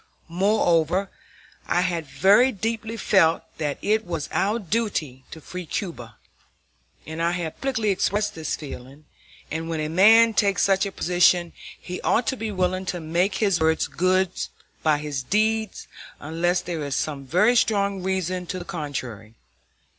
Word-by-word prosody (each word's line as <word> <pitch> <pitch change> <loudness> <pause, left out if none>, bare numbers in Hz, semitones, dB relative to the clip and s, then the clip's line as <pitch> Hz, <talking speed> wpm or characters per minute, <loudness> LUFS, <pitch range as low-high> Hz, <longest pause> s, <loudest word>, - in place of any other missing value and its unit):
Moreover, 180 -1 +1 0.6
I 175 - +2
had 170 -4 -2
very 205 - +4
deeply 225 +1 -3
felt 165 -7 +3 0.2
that 145 -3 -2
it 215 +1 +2
was 165 -6 -4
our 205 +4 +1
duty 185 - -2
to 160 - -10
free 180 +2 -8
Cuba, 125 - -5 0.9
and 160 +1 -6
I 170 +1 +1
had 170 -3 -4
publicly 245 -6 0
expressed 205 +2 0
this 160 -5 -3
feeling; 140 0 -10 0.5
and 160 +1 -3
when 165 -1 -2
a 155 0 -2
man 220 +7 +6
takes 200 -2 +2
such 195 0 +2
a - - -6
position, 175 -1 +2 0.3
he 180 0 -7
ought 235 - +1
to 265 - 0
be 225 -3 -4
willing 185 -1 -1
to 180 - -2
make 170 +5 0
his 200 -5 +1
words 160 0 +2
good 185 +1 +1 0.5
by 155 -2 +3
his 145 -3 -4
deeds 215 - 0 0.3
unless 170 +4 0
there 170 -3 -4
is 140 -1 -3
some 140 -3 -3
very 200 - +3
strong 200 -4 +1
reason 185 -1 -2
to 185 - -4
the 175 - -7
contrary. 130 - -6
180 Hz, 155 wpm, -24 LUFS, 160-200 Hz, 0.9 s, man